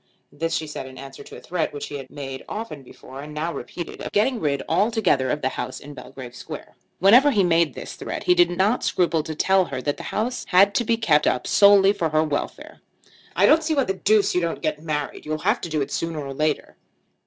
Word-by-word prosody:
This 165 +2 -2
she 160 - -2
said 150 -3 -7
in 130 0 -12
answer 135 0 -10
to - - -12
a - - -9
threat, 175 -2 -2
which 145 - -6
he 145 - -5
had 130 -1 -10
made 135 -2 -7
often 210 -10 -6
before 130 +1 -12
and 150 +1 -9
now 165 +3 -2
repeated, 175 -2 -7
of - - -5
getting 230 +4 +1
rid 140 -5 -1
altogether 195 - +2
of 150 +3 -2
the 130 - +2
house 130 0 -5
in 145 +1 -11
Belgrave 125 -3 -10
Square. - - -9 0.2
Whenever 240 +10 +6
he 210 -8 +2
made 170 -2 +2
this - - -7
threat - - -6
he 360 - +4
did 355 0 +4
not 195 +7 +1
scruple 170 -3 +1
to 155 +1 -6
tell 190 +3 +3
her 130 - -5
that 145 +2 -2
the - - -7
house 240 +4 -2
had 200 +2 +5
to 220 - +1
be 230 0 +1
kept 155 -10 +3
up 125 - 0
solely 200 -1 +6
for 165 -5 -1
her 155 +1 +2
welfare. 150 -2 -4 0.5
"I - - +4
don't 320 +1 +5
see 315 0 0
why 275 - +3
the 195 - -1
deuce 205 +1 +2
you 180 - +1
don't 170 0 -3
get 155 -1 -1
married. 150 -2 -4
You'll 155 0 -3
have 210 +9 0
to 170 - -5
do 155 -2 -1
it 135 - -3
sooner 165 -1 -3
or 140 -2 -5
later." 155 +2 -2
165 Hz, 240 wpm, -23 LUFS, 145-200 Hz, 0.5 s, Whenever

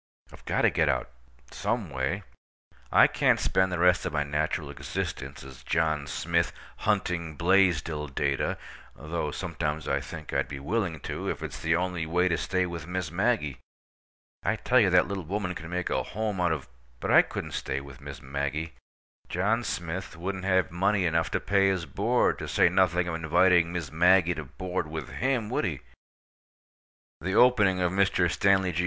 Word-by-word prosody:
I've - - -14
got - - 0
to - - +5
get - - +2
out—some 65 - -4
way. 70 +10 -2 0.7
I - - +7
can't - - +2
spend 95 0 +1
the 90 - -1
rest 90 +1 +4
of - - -2
my 75 -1 +1
natural 75 +2 -2
existence - - -5
as 65 -1 -12
John 80 -3 0
Smith, 85 +4 0 0.3
hunting 85 -3 -1
Blaisdell 85 -4 +2
data—though 70 +3 -3
sometimes 75 -2 -3
I 70 0 0
think 75 +1 -8
I'd - - +1
be 70 0 -6
willing 85 0 -2
to, - - -4
if - - -4
it's - - -6
the 85 -1 +1
only 90 -2 -2
way 90 +3 +2
to 85 - +2
stay 95 -1 0
with 85 -3 -6
Miss 90 -3 -3
Maggie. 85 - 0 0.8
I - - 0
tell 125 - +3
you, 105 -5 +4
that 90 -1 +4
little 100 -1 -4
woman 90 +2 -2
can 80 -2 -8
make 90 0 -2
a - - +1
home 105 -2 -3
out 90 -2 +2
of— 75 -4 -3 0.3
But - - -2
I - - +8
couldn't - - -6
stay 65 - -2
with 70 -1 -12
Miss 70 -3 -9
Maggie. 70 +4 -3 0.6
John 105 +7 +1
Smith 85 -2 -4
wouldn't 95 +2 -4
have 95 -3 +2
money 95 +2 +1
enough 80 -1 +1
to - - 0
pay 100 -1 +2
his 95 -3 0
board, 115 +8 +1
to - - -5
say - - +4
nothing 90 -1 +2
of 90 - -2
inviting 85 +1 +3
Miss 85 -6 -4
Maggie 90 +2 +4
to 80 -2 -6
board 90 +3 -4
with 80 -4 -5
him, 125 -4 -1
would - - 0
he? 75 -8 -3 1.4
The 95 +3 -3
opening 105 -6 +4
of 90 -1 +1
Mr. 95 -2 +2
Stanley 95 -1 +3
G. 85 - -3
85 Hz, 180 wpm, -27 LUFS, 75-95 Hz, 1.4 s, I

